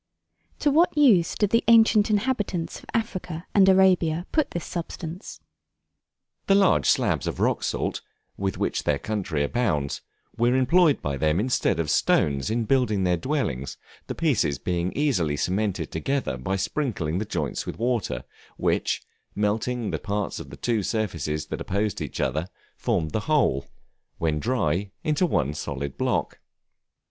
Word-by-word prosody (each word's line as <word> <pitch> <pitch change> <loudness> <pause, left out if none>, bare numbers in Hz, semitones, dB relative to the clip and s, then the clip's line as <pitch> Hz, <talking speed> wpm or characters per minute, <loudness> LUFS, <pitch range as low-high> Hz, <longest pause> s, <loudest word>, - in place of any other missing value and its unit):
To 295 - +3
what 320 +2 +3
use 220 - +5
did 210 -2 +1
the 230 - +3
ancient 225 -2 +6
inhabitants 210 -6 -1
of - - -16
Africa 185 -7 -3
and 195 -2 +6
Arabia 180 -3 +4
put 310 -3 +1
this 170 - -5
substance? 165 - -6 1.1
The 195 - +5
large 195 -2 +4
slabs - - +2
of - - -3
rock - - +1
salt, - - -2 0.3
with 95 -1 -2
which - - -1
their 75 - +1
country 95 -6 -2
abounds, 75 - -1 0.3
were 120 +2 +2
employed 145 +4 +3
by 70 -1 -2
them 80 +4 +1
instead 120 -7 +1
of 75 -3 0
stones, 70 +4 +2
in 115 +1 0
building 110 -6 +2
their 90 -1 +2
dwellings, 85 - -2 0.3
the - - -4
pieces 105 - +1
being 90 +3 -2
easily 90 - +1
cemented 95 -2 -1
together 135 - -1
by 65 +10 -2
sprinkling 95 - -2
the - - -1
joints 85 -8 -3
with - - -5
water, 120 -2 -1 0.3
which, - - 0 0.3
melting 110 +3 -1
the - - -2
parts 100 0 -3
of - - -9
the - - -10
two 115 -3 0
surfaces 85 -8 -2
that - - -5
opposed 100 +1 -1
each - - -5
other, 80 +4 -1 0.3
formed 80 -1 -1
the - - 0
whole, 95 - +2 0.5
when 80 -2 0
dry, 100 -4 0
into 155 +4 +2
one 70 - 0
solid 70 -2 -5
block. - - -1
110 Hz, 155 wpm, -25 LUFS, -, 1.1 s, ancient